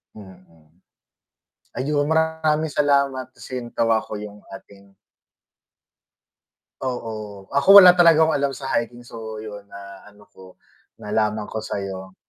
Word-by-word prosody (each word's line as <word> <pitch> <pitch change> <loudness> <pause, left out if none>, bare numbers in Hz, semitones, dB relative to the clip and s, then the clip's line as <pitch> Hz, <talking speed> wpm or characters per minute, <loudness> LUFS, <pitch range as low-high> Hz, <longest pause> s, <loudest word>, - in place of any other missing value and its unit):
Mm. 95 -6 -16 1.1
Ayun 145 +2 -1
maraming 160 -1 0
salamat 140 -3 0
kasi 130 - -8
natawa 115 -1 0
ako 105 -1 -8
yung 105 -1 -9 0.2
ating 100 -3 -15 1.9
Oo, 110 -6 -6
ako 190 +8 +7
wala 180 -2 +10
talaga 165 -3 +5
akong 160 - 0
alam 140 -1 -1
sa 135 - -9
hiking, 120 +1 -3
so 110 -2 -9
yun 105 -1 -8
na 100 -1 -12
ano 105 0 -20
ko, 95 -1 -16 0.4
nalaman 105 0 -2
ko 110 - -6
sa'yo. 95 -3 -6
115 Hz, 120 wpm, -22 LUFS, 100-140 Hz, 1.9 s, wala